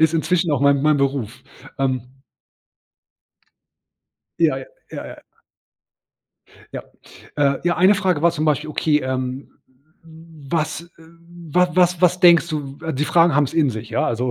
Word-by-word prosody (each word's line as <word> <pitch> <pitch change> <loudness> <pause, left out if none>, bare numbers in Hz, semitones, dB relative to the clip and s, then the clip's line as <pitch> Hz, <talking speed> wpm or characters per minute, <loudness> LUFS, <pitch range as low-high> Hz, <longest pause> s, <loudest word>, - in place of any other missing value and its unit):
ist 160 0 +3
inzwischen 170 +1 0
auch 145 -3 0
mein 140 -1 +3
mein 150 -1 +3
Beruf, 135 -3 -2 0.4
ähm. 130 -1 -3 2.2
Ja, - - +2
ja, - - -7 0.3
ja, - - -7
ja. - - -11 1.6
Ja, - - -5 0.5
äh, 140 -1 +1
ja 175 - +1
eine 185 +4 +5
Frage 185 -6 -1
war 170 - +4
zum 155 -2 -3
Beispiel: 155 0 0
„Okay, 150 0 +1
ähm, 130 0 -4 0.5
was 160 0 -6
w 165 0 -18 0.4
wa 180 0 +4
was 180 -1 +2
was 180 0 +2
denkst 170 -1 +5
du?" 145 -3 -5
Die 145 +3 -1
Fragen 165 -2 +3
haben 145 - +3
es 140 - -7
in 150 -5 +2
sich, 110 0 -8
ja, - - 0
also, 120 +2 -2
150 Hz, 150 wpm, -20 LUFS, 135-170 Hz, 2.2 s, eine